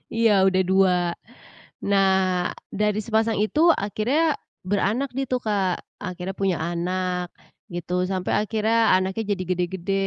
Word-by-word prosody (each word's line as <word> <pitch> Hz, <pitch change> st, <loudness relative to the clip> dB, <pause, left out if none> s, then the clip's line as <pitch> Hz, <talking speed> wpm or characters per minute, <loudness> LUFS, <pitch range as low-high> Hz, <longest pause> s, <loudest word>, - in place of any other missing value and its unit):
Iya 230 Hz, -1 st, +4 dB, 0.2 s
udah 190 Hz, 0 st, +3 dB
2, 190 Hz, -1 st, +4 dB, 0.9 s
nah 195 Hz, -1 st, +3 dB, 0.6 s
dari 210 Hz, 0 st, 0 dB
sepasang 220 Hz, +1 st, +1 dB
itu 215 Hz, +8 st, 0 dB
akhirnya 260 Hz, +10 st, 0 dB, 0.3 s
beranak 215 Hz, +7 st, 0 dB
dia 270 Hz, 0 st, -1 dB
tuh 250 Hz, -, +1 dB
Kak 195 Hz, -4 st, 0 dB, 0.2 s
akhirnya 185 Hz, +1 st, -5 dB
punya 190 Hz, -3 st, +1 dB
anak 180 Hz, +1 st, -2 dB, 0.5 s
gitu 175 Hz, 0 st, -5 dB, 0.2 s
sampai 185 Hz, -1 st, -2 dB
akhirnya 220 Hz, +1 st, 0 dB, 0.2 s
anaknya 190 Hz, +3 st, 0 dB
jadi 190 Hz, -, -5 dB
gede-gede 180 Hz, +1 st, -2 dB
195 Hz, 125 wpm, -24 LUFS, 185-220 Hz, 0.9 s, Iya